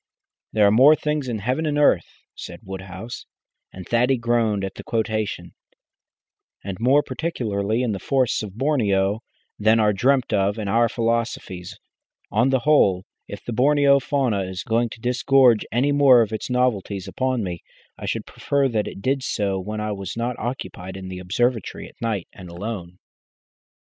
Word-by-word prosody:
"There 105 -1 +4
are 100 - +5
more 135 +8 +7
things 150 -3 -2
in 120 -3 -2
heaven 130 +10 -1
and 145 -1 0
earth," 140 - +2
said - - -9
Woodhouse 95 +4 -8 0.4
and 95 -1 -10
Thaddy 125 +3 +2
groaned 115 -4 +1
at 95 - -6
the - - -10
quotation 110 -2 -2 1.1
"and 95 -1 -5
more 135 +5 +4
particularly 120 -7 -2
in 120 - 0
the 100 - -3
forests 130 +3 +1
of 105 -1 -8
Borneo, 105 -8 +1 0.4
than 110 +2 +4
are 105 -1 +3
dreamt 130 +4 +1
of 100 +1 +1
in 105 -2 -4
our 115 +3 +3
philosophies. 115 -6 -2 0.5
On 120 +5 +3
the 130 -2 +2
whole, 100 -11 +3 0.2
if - - -8
the 120 - -4
Borneo 140 +2 +4
fauna 130 -7 0
is 95 -1 -5
going 115 +1 +1
to 115 - -11
disgorge 125 -1 +3
any 130 +5 +2
more 135 -4 +6
of 110 0 -6
its 110 - -4
novelties 105 -6 0
upon 130 +3 -1
me, 90 -3 -5 0.3
I - - -7
should - - -2
prefer 140 -1 0
that 110 -3 -1
it 100 - -8
did 135 +1 +1
so 100 -6 -1
when 105 +3 -5
I 105 0 -2
was 100 0 -5
not 120 +1 -2
occupied 95 -6 -5
in 95 -1 -8
the 90 -1 -6
observatory 115 +5 -1
at - - -20
night 110 -6 -2
and 90 -3 -11
alone." 90 -1 -6
115 Hz, 170 wpm, -23 LUFS, 100-130 Hz, 1.1 s, more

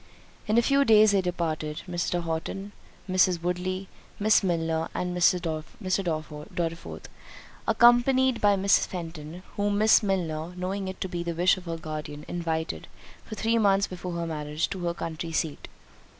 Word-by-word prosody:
In 215 +2 +2
a 235 - +5
few 275 +3 +4
days 215 -4 +6
they 200 -1 +3
departed; 160 -4 -3
Mrs. 175 0 -1
Horton, 170 +5 -4 0.4
Miss 185 0 +4
Woodley, 180 +2 -2 0.3
Miss 215 +1 +4
Milner, 165 -3 0
and 180 0 -2
Mr. 180 +1 +4 0.6
Dorriforth, 165 0 -4 0.6
accompanied 245 +1 +4
by 205 -1 +5
Miss 195 0 +3
Fenton, 165 -1 -7
whom 205 0 +1
Miss 215 +1 +6
Milner, 175 -4 -2
knowing 190 +2 -3
it 190 - -6
to - - -1
be 175 -2 -4
the 170 -1 -3
wish 180 +2 +4
of 185 -1 -11
her 165 -1 -3
guardian, 150 -2 -6
invited, 165 -2 -3 0.4
for 215 - -7
three 225 +2 +1
months 200 -2 +4
before 180 -1 -6
her 170 0 -2
marriage, 150 -1 -2
to 190 - -4
her 170 0 -1
country 165 0 -5
seat. 160 -2 -2
180 Hz, 155 wpm, -27 LUFS, 165-200 Hz, 0.6 s, days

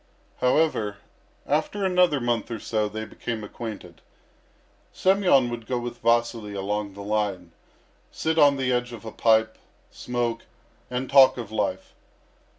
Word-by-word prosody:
However, 125 -6 +1 0.5
after 155 +7 0
another 180 -5 +3
month 120 -2 -1
or 115 - -4
so 105 0 -1
they 110 +1 -5
became 110 0 -5
acquainted. 105 -5 -8 0.9
Semyon 185 -9 +3
would 115 -2 -6
go 125 - -1
with 120 0 -5
Vasily 115 -3 0
along 100 0 -3
the 100 - -8
line, 100 -4 -2 0.6
sit 160 0 -1
on 145 -2 +6
the 130 -1 0
edge 125 0 -1
of 115 -1 -10
a 110 - -6
pipe, 110 -1 +2 0.3
smoke, 120 -2 -3 0.4
and 125 +1 -3
talk 135 -1 +6
of 115 -4 -6
life. 110 - -2
120 Hz, 140 wpm, -25 LUFS, 105-130 Hz, 0.9 s, on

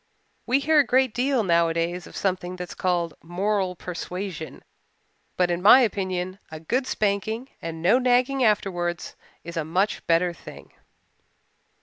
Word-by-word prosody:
We 255 - +3
hear 300 +2 +3
a - - +6
great 260 -1 +2
deal 255 -1 +1
nowadays 170 0 +1
of - - -13
something 185 -2 -2
that 180 -1 -7
is - - -7
called 175 -3 -1
'moral 185 +2 -1
persuasion,' 180 -1 -6 0.7
but 180 -1 +2
in 175 0 -1
my 215 +7 +8
opinion 185 -4 -2
a 155 - -8
good 250 - -1
spanking 215 +5 -1
and 165 -1 -6
no 215 +9 +5
nagging 255 +1 +2
afterwards 175 -6 0 0.3
is 170 +1 -8
a 165 - 0
much 185 +7 -1
better 170 +1 +2
thing." - - -13
185 Hz, 145 wpm, -24 LUFS, 175-225 Hz, 0.7 s, my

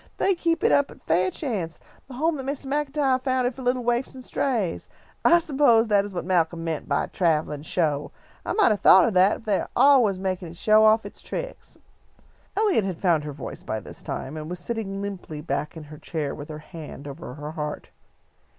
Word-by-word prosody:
They 390 - +3
keep 335 -2 0
it - - +4
up 285 -1 +3
at - - -15
'Fairchance,' 185 - -1 0.3
the 265 - -10
home 315 +5 +1
that 265 - -6
Mr. 280 0 -4
MacIntyre 280 -1 +1
founded 255 -1 0
for 265 - -10
little 250 0 0
waifs 240 +2 -1
and 255 -1 -10
strays. 225 -11 -1 0.3
I 345 - +7
s'pose 270 -8 +3
that 200 -1 +4
is 205 - -7
what 175 -3 -4
Malcolm 170 -2 +1
meant 160 -3 -3
by 140 - +2
a - - -4
travellin' 155 -4 0
show. 150 -2 -1 0.3
I - - -2
might 425 -3 +4
have 210 - +1
thought 190 - +7
of 225 - -1
that, 190 +4 +4
for - - -23
they 205 -3 +2
are - - -5
always 250 -9 +5
makin' 185 -1 -3
it 165 +1 -11
show 215 +3 +5
off 220 +1 +4
its - - -9
tricks." - - -7 0.8
Eliot 410 - +3
had 190 -3 -3
found 165 -5 +2
her 150 - -4
voice 140 -1 -7
by 110 - -3
this - - -10
time, 140 +4 -5
and 155 0 -6
was 180 - -4
sitting 195 0 -4
limply 185 -6 -6
back 150 0 -3
in 160 - -8
her 150 0 -12
chair 150 -4 -3
with 145 0 -9
her 155 - -6
hand 155 -3 -10
over 140 -2 -8
her 150 +1 -6
heart. 150 -2 -5
195 Hz, 215 wpm, -25 LUFS, 160-255 Hz, 0.8 s, I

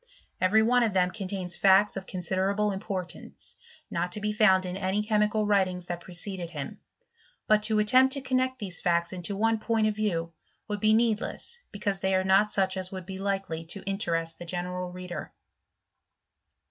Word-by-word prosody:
Every 210 +4 +4
one 245 +2 +4
of 225 -4 +1
them' 180 -1 +2
contains 185 -3 -4
facts 195 +1 +4
of 195 -1 -6
con 185 - -5
siderable 195 +4 0
importance, 190 -2 -7 0.4
not 180 - -1
to - - 0
be 210 0 -1
found 190 -3 +4
in 180 0 -4
any 195 +2 -1
chemical 210 0 +1
writings 185 -3 +1
that 175 -1 -5
preceded 180 0 -5
him; 150 -5 -7 0.7
but 215 0 +4
to 215 0 +3
attempt 255 +5 +5
to 275 - -4
connect 260 0 0
these 195 -7 -4
facts 170 0 +1
into 185 +2 -4
one 225 +1 +2
point 225 0 +1
of 215 -1 +1
view 170 -6 -1 0.3
would 210 -1 -3
be 215 +1 +4
needless, 230 - -1
because 200 -1 -2
they 190 0 +1
are 185 - +2
not 195 +3 +4
such 190 -1 +1
as 185 -1 -4
Vould 185 -2 -7
be 190 0 -7
likely 195 -5 -2
to 190 +4 -5
in 195 0 -1
terest 165 -4 -1
the 175 - -7
general 180 +1 -3
reader. 180 -1 -7
195 Hz, 185 wpm, -28 LUFS, 180-210 Hz, 0.7 s, attempt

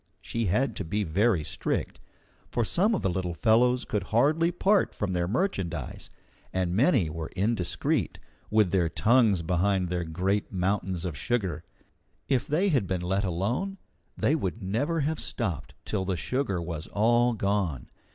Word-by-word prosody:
She 115 -1 -3
had 115 +6 +1
to - - -2
be 100 +5 -1
very 95 +1 +2
strict, - - -3 0.5
for 120 -2 0
some 205 - +2
of - - -3
the 95 - +2
little 90 -1 -2
fellows 125 - +3
could 105 -3 -2
hardly 155 +9 +3
part 195 +3 +2
from 100 -2 -2
their 90 -1 0
merchandise, 95 - -2 0.4
and 90 -1 -1
many 120 - +4
were 80 0 -5
indiscreet, 100 -2 0 0.3
with 105 -4 +3
their 90 -4 +2
tongues 110 -3 +3
behind 90 +2 +1
their 90 0 -1
great 95 +5 -1
mountains 95 -1 -1
of 85 -4 -3
sugar. 90 - -1 0.6
If 130 -3 +1
they 175 +7 +2
had 130 - +1
been 90 -1 -1
let 95 +3 0
alone, 110 - -1 0.4
they 145 - +2
would 100 - -2
never 135 - -1
have 155 +2 -1
stopped 95 - -3
till 100 -3 -1
the 95 -1 -1
sugar 125 -7 -1
was 85 -2 -5
all 120 +3 +3
gone. 100 - -1
100 Hz, 160 wpm, -27 LUFS, 90-120 Hz, 0.6 s, many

